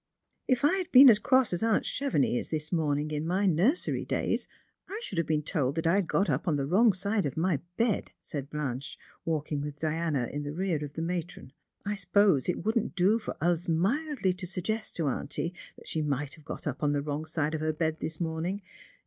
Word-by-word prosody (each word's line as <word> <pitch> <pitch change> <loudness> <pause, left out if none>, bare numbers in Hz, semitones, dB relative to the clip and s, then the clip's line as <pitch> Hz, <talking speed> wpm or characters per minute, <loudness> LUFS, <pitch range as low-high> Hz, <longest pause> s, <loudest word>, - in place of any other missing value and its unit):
" - - -47
If 250 - -1
I 350 +6 +4
had 370 -3 -3
been 260 0 +10
as 210 - +3
cross 260 -3 +3
as 175 - -1
aunt 225 -1 +2
Chevenix 275 - +1
is - - -2
this 155 -1 -2
morning 150 -3 0
in 150 +1 -2
my 190 +4 +1
nursery 195 - +2
days, - - -1 0.4
I 410 +3 -4
should 185 - -2
have 165 - 0
been 155 -1 +1
told 145 -4 0
that 165 0 -2
I 170 +4 +4
had 195 -4 0
got 195 +4 +1
up - - -1
on 160 - +2
the 140 -1 -1
wrong 210 +9 +5
side 200 -1 0
of 135 - -6
my 165 -3 +1 0.2
bed," 230 -3 0
said 145 -3 -5
Blanche, 140 -3 -4 0.3
walking 150 -2 -1
with 145 0 -6
Diana 155 -5 0
in 145 - -2
the 145 0 -5
rear 170 -3 -1
of 145 -1 -7
the 160 - -2
matron. 170 -6 -4 0.2
" - - -44
I 205 - -1
suppose 200 -7 +3
it 180 - -1
wouldn't 220 -4 0
do 195 +5 +3
for 215 - -6
us 170 +1 +1
mildly 200 - +1
to 180 -1 -5
suggest 205 +5 -3
to 165 -4 -1
auntie 165 +5 -2 0.2
that - - -14
she 160 - -1
must 145 -1 -2
have 155 - -13
got - - -6
up 145 -2 -3
on 145 -1 +2
the 145 -1 0
wrong 150 +1 -3
side 155 -1 -1
of 155 - -2
her 155 0 +1
bed 160 0 -1
this 160 -1 -5
morning. 170 +4 -2
165 Hz, 230 wpm, -29 LUFS, 150-200 Hz, 0.4 s, been